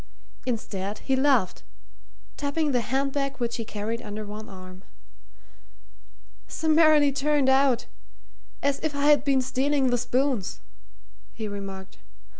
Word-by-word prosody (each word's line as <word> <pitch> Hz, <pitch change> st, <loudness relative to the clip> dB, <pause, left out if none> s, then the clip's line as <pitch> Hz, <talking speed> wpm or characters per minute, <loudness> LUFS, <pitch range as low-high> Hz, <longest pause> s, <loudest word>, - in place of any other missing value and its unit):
Instead, 205 Hz, -4 st, -3 dB
he 265 Hz, -, +2 dB
laughed, 265 Hz, -8 st, +2 dB, 0.7 s
tapping 290 Hz, +1 st, -1 dB
the 245 Hz, -2 st, +2 dB
hand 270 Hz, +4 st, -1 dB
bag 275 Hz, -1 st, -2 dB
which 235 Hz, -1 st, -2 dB
he 230 Hz, -, -3 dB
carried 220 Hz, +2 st, -4 dB
under 210 Hz, -1 st, -6 dB
one 210 Hz, +1 st, -8 dB
arm. 185 Hz, -1 st, -11 dB, 1.7 s
"Summarily 310 Hz, -2 st, +4 dB
turned 285 Hz, 0 st, +1 dB
out 265 Hz, -2 st, +3 dB, 0.8 s
as 280 Hz, 0 st, +1 dB
if 310 Hz, -2 st, -3 dB
I 285 Hz, 0 st, 0 dB
had 295 Hz, 0 st, +5 dB
been 270 Hz, -2 st, +2 dB
stealing 265 Hz, +1 st, +1 dB
the 245 Hz, -, +2 dB
spoons," 245 Hz, -3 st, -1 dB, 0.7 s
he 220 Hz, -2 st, -5 dB
remarked. 195 Hz, -2 st, -8 dB
260 Hz, 125 wpm, -26 LUFS, 215-280 Hz, 1.7 s, had